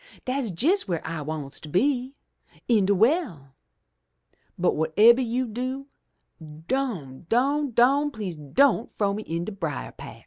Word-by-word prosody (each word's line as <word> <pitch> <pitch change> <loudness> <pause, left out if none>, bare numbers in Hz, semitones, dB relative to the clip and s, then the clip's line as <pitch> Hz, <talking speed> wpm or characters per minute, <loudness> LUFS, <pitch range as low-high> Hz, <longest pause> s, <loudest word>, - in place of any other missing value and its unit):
Dat's 255 -4 -2
jes' 385 +7 +3
w'ere 175 -4 -2
I 165 -2 -4
wants 145 -2 -5
to 155 - -10
be 255 - 0 0.3
— - - -29
in 215 -5 +3
de 200 - +3
well. 195 - +1 1.0
But, 180 - +2
whatebber 210 +11 +5
you 245 +2 -1
do, 255 +4 -5 0.8
don', 180 - -3
don', 280 +5 +2
don', 270 +5 +3
please 210 - -5
don' 215 - +2
frow 200 -2 -1
me 210 - -4
in 165 +1 -3
de 215 - -5
brier 165 -9 -4
patch!' - - -11
220 Hz, 150 wpm, -25 LUFS, 165-265 Hz, 1.0 s, whatebber